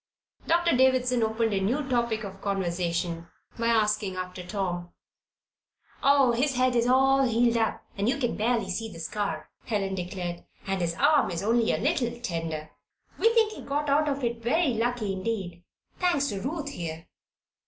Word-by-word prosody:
Doctor 340 -1 +3
Davison 255 -1 +3
opened 220 0 +1
a 195 - +1
new 260 +9 0
topic 235 -3 0
of 195 -1 -8
conversation 170 -3 -2 0.3
by 230 - +1
asking 210 -4 +2
after 180 0 -5
Tom. 175 -2 -3 1.1
"Oh, 275 -3 +5
his 265 +4 +1
head 255 0 +2
is 235 0 +2
all 270 +1 +4
healed 235 -2 +3
up 225 -1 0
you 210 +6 +2
can 250 -4 0
just - - -8
barely 225 -3 +1
see 225 +4 -3
the 170 - -10
scar," 200 +5 -3
Helen 195 -4 -1
declared. 180 -1 -4 0.2
"And 195 -1 -1
his 170 -1 -1
arm 290 - +4
is 170 +1 -3
only 230 +1 +2
a - - +1
little 255 -6 0
tender. 165 -8 -4 0.5
We 455 - +5
think 445 -2 +4
he - - -9
got 290 +1 -1
out 300 +1 +3
of 280 -1 -2
it 235 -1 -1
very 285 +7 +2
lucky 230 -3 -1
indeed 185 -3 -4 0.4
thanks 345 -6 +2
to 200 -3 -4
Ruth 290 - -3
here." 165 - -6
225 Hz, 170 wpm, -27 LUFS, 190-260 Hz, 1.1 s, Oh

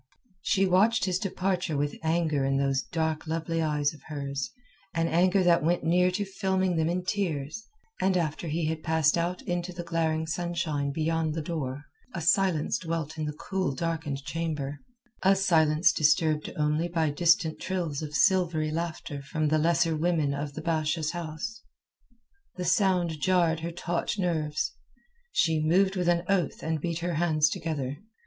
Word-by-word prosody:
She 195 +1 +2
watched 195 +5 +3
his 185 -1 0
departure 185 -5 -1
with 145 0 -2
anger 160 -3 +1
in 135 0 +1
those 135 -1 +1
dark 160 -2 -2
lovely 165 +1 -1
eyes 150 -2 +1
of 150 - -15
hers, 140 -3 -4 0.5
an 165 0 +1
anger 185 +3 +3
that 170 -3 +4
went 170 +2 +1
near 180 +2 +3
to 200 +3 -2
filming 190 -2 0
them 160 0 +1
in 180 +1 -2
tears, 180 -1 -2 0.3
and 190 -1 +3
after 165 0 -2
he 160 +1 -1
had 160 0 -2
passed 160 -1 +2
out 175 +2 -1
into 175 0 -2
the 175 -1 -6
glaring 160 -1 0
sunshine 160 -4 -2
beyond 160 +1 0
the 165 - -2
door, 145 -4 -4 0.3
a - - -2
silence 170 -1 +2
dwelt 160 -2 -4
in 155 - -1
the 150 - -3
cool 180 -1 -2
darkened 160 -3 -3
chamber—a 165 - -2
silence 160 -4 +4
disturbed 155 0 +2
only 150 +2 +1
by 165 -3 0
distant 165 +1 +2
trills 170 -6 -2
of 150 -1 -5
silvery 175 -5 +2
laughter 160 -3 -4
from 155 +2 -1
the 155 +1 +3
lesser 165 0 +2
women 155 -3 +1
of 140 0 -4
the - - -6
Basha's 160 -1 0
house. 175 +6 -5 0.9
The 180 - -4
sound 175 -4 +2
jarred 170 -3 +3
her 165 +1 -4
taut 175 +3 -2
nerves. 160 -5 -1 0.6
She 160 -2 +2
moved 190 +5 +3
with 180 -2 +1
an 170 0 +2
oath 190 -6 0
and 160 -1 -1
beat 170 0 -2
her 175 - -1
hands 155 -2 +2
together. 150 -6 -3
165 Hz, 165 wpm, -28 LUFS, 155-180 Hz, 0.9 s, that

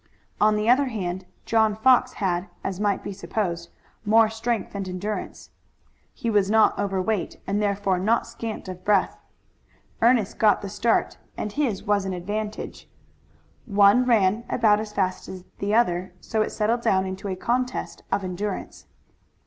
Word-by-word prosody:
On 215 0 +4
the 210 +1 -1
other 265 +3 +4
hand, 185 -5 -4 0.2
John 220 -2 +2
Fox 255 +3 +4
had, 180 -1 -1 0.2
as 190 -1 -3
might 205 -2 0
be 200 - -5
supposed, 170 -2 -3 0.3
more 220 +1 +5
strength 225 0 -2
and 195 -2 -4
endurance. 195 +4 -5 0.6
He - - -6
was 205 -2 +2
not 220 0 +4
over 195 -2 -1
weight 205 +1 -2
and 205 +2 -1
therefore 200 -2 0
not 220 +5 +2
scant 225 -3 -6
of 185 -1 -8
breath. 200 -1 +2 0.8
Ernest 230 -3 +3
got 215 -2 +4
the 200 - -4
start 225 +4 0 0.2
and 210 - -3
this 235 -7 -1
was 205 -1 +1
an 190 - -2
advantage. 210 +4 -5 0.8
One 205 +3 +5
ran 220 -2 +3
about 215 -3 +3
as 215 -1 -5
fast 185 -3 -2
as 185 -1 -8 0.2
the 205 +2 0
other, 180 -5 +1
so 220 +3 -1
it - - 0
settled 230 +2 0
down 190 -4 +2
into 190 +2 -5
a 190 - -2
contest 250 +6 -2
of 200 - 0
endurance. 190 +2 -5
205 Hz, 160 wpm, -24 LUFS, 190-220 Hz, 0.8 s, more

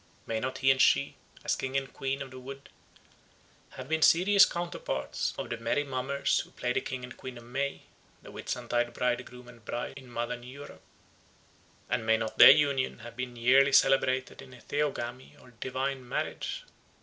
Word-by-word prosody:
May 110 -1 -2
not 130 +3 -3
he 135 - +4
and 130 - +2
she, 70 0 +3 0.3
as - - +2
King 135 +1 -2
and 135 0 -4
Queen 135 +1 -3
of 135 - -12
the 130 - -9
Wood, 135 +2 -10 1.1
have 130 0 -7
been 160 +1 0
serious 195 +5 +6
counterparts 170 - -3
of - - -5
the - - -2
merry 145 - 0
mummers 135 0 0
who - - -6
play 125 0 -2
the - - 0
King 130 -1 -5
and 125 0 -8
Queen 130 -2 -8
of 120 - -11
May, 135 +4 -3 0.4
the - - -11
Whitsuntide 120 0 -2
Bridegroom 125 0 -2
and 120 -2 -15
Bride 120 +4 -4
in 130 -2 -12
modern 120 +1 -4
Europe? 135 +4 -11 1.1
and - - -1
may 110 0 +3
not 110 -1 -5
their - - +12
union 140 -3 +3
have 120 - -10
been 125 -1 -5
yearly 130 +4 +5
celebrated 130 -1 +3
in 125 - -13
a - - -15
theogamy 130 -4 -3
or 125 - -17
divine 130 -1 -3
marriage? - - -3
130 Hz, 180 wpm, -29 LUFS, 120-135 Hz, 1.1 s, their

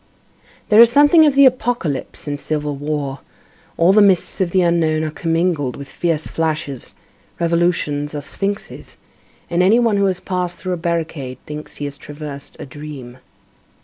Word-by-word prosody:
There 215 -1 +6
is 235 0 +9
something 295 +4 +6
of 285 - +1
the 280 0 +7
apocalypse 240 - -1
in 145 - -2
civil 150 -1 -2
war, 145 -1 -3 0.6
all 170 +3 +5
the 210 - +6
mists 195 -1 +3
of 185 - +1
the 185 +1 +2
unknown 160 -2 +1
are 155 - -2
commingled 165 -5 -1
with 140 0 -9
fierce 165 -3 -1
flashes, 155 -5 -3 0.4
revolutions 165 -4 0
are 145 - -3
sphinxes, 200 +7 -5 0.5
and 170 +1 0
any 195 +5 +5
one 230 -4 +2
who 200 - +2
has 185 -2 0
passed 180 -2 -3
through 185 -1 -3
a - - -2
barricade 165 -6 -3
thinks 150 0 -7
he 145 - -4
has 140 0 -7
traversed 145 -1 -9
a - - -6
dream. 135 -3 -10
165 Hz, 165 wpm, -19 LUFS, 145-185 Hz, 0.6 s, is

